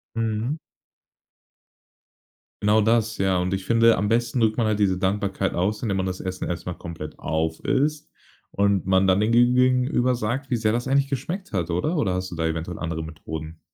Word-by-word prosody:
Mhm. 115 +6 -1 2.0
Genau, 105 +1 +4
das, 110 0 +2
ja, 95 -1 +2
und 90 +1 -1
ich 95 -1 -2
finde, 115 0 +4
am 105 +1 0
besten 120 +1 +1
drückt 110 0 +2
man 115 -2 +2
halt 105 -1 0
diese 95 -3 +2
Dankbarkeit 95 0 -1
aus, 100 +5 -1
indem 105 -5 -1
man 95 - 0
das 95 0 -3
Essen 95 -1 -4
erst 85 - -4
mal 90 - -3
komplett 80 -3 -8
aufisst 130 - -1 0.4
und 100 -2 +1
man 95 0 +3
dann 95 +2 +3
den 110 +2 +1
gegen 120 +1 +4
gegenüber 125 0 +3
sagt, 120 +4 -2
wie 120 - +1
sehr 110 0 +1
das 120 +1 -1
eigentlich 140 0 +3
geschmeckt 155 - -4
hat 85 -3 -1
oder? 90 - 0
Oder 95 - 0
hast 95 0 -3
du - - -5
da 80 0 -1
eventuell 80 +2 -3
andere 80 -1 -3
Methoden? 80 0 -8
105 Hz, 190 wpm, -24 LUFS, 90-120 Hz, 2.0 s, Genau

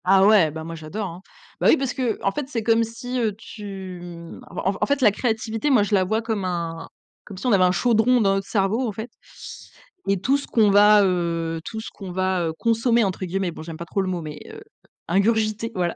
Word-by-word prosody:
Ah, 190 +1 +5
ouais, 205 -6 +6
bah, 160 +1 -7
moi, 165 +1 -7
j'adore, 165 +7 -5
hein. 175 +1 -9 0.4
Bah, - - +2
oui, - - +6
parce 270 -3 -2
qu'en 235 -6 -1
fait, 285 +5 -4
c'est 230 -5 -3
comme 230 +1 +3
si, 240 +3 -5
heu, 220 -3 0
tu, 195 -4 -8
mmh, 170 -1 -10
en 190 +2 -2
en - - +3
fait, 285 0 +1
la 210 - +6
créativité, 225 +3 -1
moi, 250 -7 +5
je 205 - -3
la 190 -2 +4
vois 220 +5 0
comme 220 -3 -2
un 170 -2 -3 0.4
comme 195 - -11
si 195 - -8
on 250 - +3
avait 195 -3 +5
un 180 - +4
chaudron 230 +6 +3
dans 195 -3 +3
notre 195 0 -2
cerveau, 200 +2 +1
au - - -2
fait 220 +3 -7 1.0
et 195 -1 +1
tout 260 +9 +2
ce 280 - -8
qu'on 215 -3 +3
va, 205 +1 +6
heu, 165 -3 -1
tout 220 - -5
ce - - -7
qu'on 195 -3 -9
va, 185 -1 0
heu, 160 - -3
consommer, 230 0 +2
entre 190 -2 -2
guillemets, 185 0 -2
bon, 165 - -10
j'aime 160 -1 -8
pas 170 - -7
trop 195 - -1
le 190 - -2
mot 180 -2 -2
mais 155 -1 -7
heu 440 0 -11 0.5
ingurgiter, 215 +4 +1
voilà, 175 -2 -1
200 Hz, 235 wpm, -23 LUFS, 180-225 Hz, 1.0 s, ouais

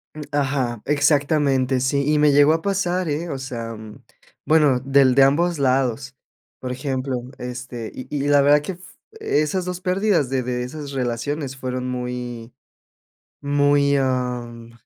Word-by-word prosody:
Mm, 155 - -7
ajá, 135 -5 -1
exactamente, 145 -2 +2
sí. 140 +2 0
Y - - +3
me 150 0 +5
llegó 145 +2 +5
a 165 - -1
pasar, 185 -3 -1
eh, 155 +4 -3
o 140 - -3
sea, 120 -4 -6
mm, 110 -1 -12 0.4
bueno, 150 -5 +4
del 135 0 +3
de 135 - +7
ambos 165 +4 +2
lados, 135 0 0 0.4
por 130 - -5
ejemplo, 130 -1 -3 0.2
este, 125 -2 -7
y 130 - -8
y 145 -1 -2
la 145 -1 +5
verdad 145 +1 +5
que 170 +6 -5
f 180 - -16 0.4
esas 165 - 0
2 180 0 -5
pérdidas 185 -6 +1
de 135 -1 0
de 125 0 -2
esas 145 +3 -7
relaciones, 130 +2 -3
fueron 130 -1 -4
muy 125 -2 -5 0.9
muy 145 0 +2
am, 125 -3 -2
135 Hz, 155 wpm, -22 LUFS, 125-150 Hz, 0.9 s, de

